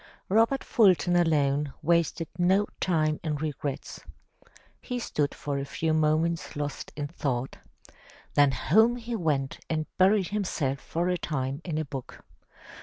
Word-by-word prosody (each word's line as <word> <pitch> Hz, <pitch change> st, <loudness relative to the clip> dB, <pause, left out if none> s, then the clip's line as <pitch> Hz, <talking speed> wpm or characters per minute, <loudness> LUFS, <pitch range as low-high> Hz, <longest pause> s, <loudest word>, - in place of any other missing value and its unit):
Robert 225 Hz, +7 st, +3 dB
Fulton 185 Hz, -5 st, +4 dB
alone 145 Hz, -4 st, +2 dB
wasted 170 Hz, 0 st, +1 dB
no 185 Hz, +4 st, +3 dB
time 155 Hz, -4 st, +1 dB
in 155 Hz, -2 st, -1 dB
regrets. 145 Hz, -1 st, -4 dB, 0.8 s
He 250 Hz, -, -4 dB
stood 150 Hz, -11 st, -1 dB
for 145 Hz, -2 st, -3 dB
a -, -, -2 dB
few 160 Hz, +3 st, -1 dB
moments 160 Hz, +2 st, +1 dB
lost 145 Hz, -1 st, -4 dB
in 145 Hz, 0 st, -3 dB
thought. 135 Hz, -4 st, -3 dB, 0.8 s
Then 145 Hz, -1 st, +5 dB
home 220 Hz, -, +3 dB
he 240 Hz, -1 st, -5 dB
went 150 Hz, -8 st, -1 dB
and 155 Hz, -1 st, -1 dB
buried 190 Hz, -1 st, +4 dB
himself 170 Hz, -10 st, -1 dB
for 170 Hz, +3 st, -2 dB
a 180 Hz, -1 st, 0 dB
time 135 Hz, 0 st, -3 dB
in 160 Hz, -4 st, -3 dB
a 155 Hz, -, -1 dB
book. 135 Hz, -2 st, -8 dB
155 Hz, 140 wpm, -27 LUFS, 145-180 Hz, 0.8 s, Then